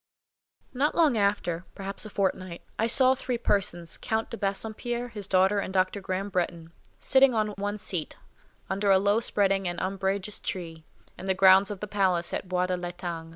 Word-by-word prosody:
Not 280 Hz, +4 st, +1 dB
long 315 Hz, -7 st, +4 dB
after, 200 Hz, -5 st, 0 dB
perhaps 195 Hz, +2 st, -3 dB
a -, -, -10 dB
fortnight, 185 Hz, -3 st, -2 dB, 0.2 s
I 225 Hz, -, +2 dB
saw 260 Hz, +2 st, +5 dB
three 255 Hz, -1 st, -3 dB
persons, 185 Hz, -7 st, -1 dB
Count 220 Hz, 0 st, -2 dB
de 230 Hz, -, -4 dB
Bassompierre, 220 Hz, +4 st, -2 dB
his 205 Hz, -4 st, -5 dB
daughter, 190 Hz, +2 st, +3 dB
and 195 Hz, -, -3 dB
Dr. 190 Hz, +1 st, 0 dB
Graham 190 Hz, +2 st, -3 dB
Bretton, 170 Hz, -3 st, -2 dB, 0.3 s
sitting 265 Hz, -2 st, +4 dB
on 215 Hz, -1 st, +1 dB
one 205 Hz, 0 st, -3 dB
seat, 180 Hz, -6 st, -4 dB, 0.5 s
under 200 Hz, +1 st, -1 dB
a 195 Hz, -, +7 dB
low 205 Hz, +3 st, +2 dB
spreading 195 Hz, -4 st, +1 dB
and 175 Hz, 0 st, -3 dB
umbrageous 195 Hz, +1 st, -2 dB
tree, 165 Hz, -3 st, -5 dB, 0.3 s
in -, -, -7 dB
the 190 Hz, -, +2 dB
grounds 190 Hz, +1 st, +6 dB
of 205 Hz, -3 st, -6 dB
the 210 Hz, -, -4 dB
palace 185 Hz, -4 st, +1 dB
at 185 Hz, -, -4 dB
Bois 180 Hz, 0 st, +1 dB
l'Etang. 175 Hz, -2 st, -5 dB
195 Hz, 175 wpm, -27 LUFS, 185-210 Hz, 0.5 s, a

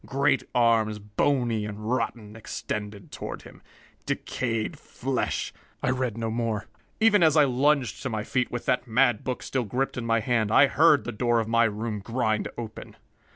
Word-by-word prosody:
Great 135 Hz, +2 st, +1 dB
arms, 115 Hz, -3 st, +3 dB
bony 115 Hz, +2 st, 0 dB
and 105 Hz, 0 st, -6 dB
rotten, 115 Hz, -3 st, -2 dB
extended 105 Hz, -2 st, -6 dB
toward -, -, -6 dB
him. -, -, -14 dB, 0.5 s
Decayed 115 Hz, -3 st, -2 dB
flesh -, -, -3 dB
" -, -, -34 dB
I -, -, +2 dB
read 125 Hz, -4 st, -2 dB
no 115 Hz, -1 st, -2 dB
more. 115 Hz, -3 st, -2 dB, 0.3 s
Even 220 Hz, -3 st, +5 dB
as 160 Hz, -2 st, +5 dB
I 150 Hz, -, +7 dB
lunged 130 Hz, -6 st, +1 dB
to 130 Hz, -, -3 dB
my 110 Hz, -3 st, -2 dB
feet, 125 Hz, +2 st, 0 dB
with 120 Hz, -, -5 dB
that 125 Hz, 0 st, 0 dB
mad 120 Hz, -1 st, +3 dB
book 130 Hz, -1 st, -3 dB
still 130 Hz, -2 st, -1 dB
gripped 125 Hz, +6 st, -2 dB
in 120 Hz, -, -3 dB
my 115 Hz, 0 st, +3 dB
hand, 110 Hz, -2 st, 0 dB
I 140 Hz, -, +7 dB
heard 150 Hz, +1 st, +4 dB
the 120 Hz, -, -4 dB
door 120 Hz, +1 st, +1 dB
of 110 Hz, -, -2 dB
my 115 Hz, +1 st, +4 dB
room 110 Hz, 0 st, -2 dB
grind 110 Hz, 0 st, -1 dB
open. 115 Hz, -2 st, -8 dB
115 Hz, 180 wpm, -26 LUFS, 110-130 Hz, 0.5 s, I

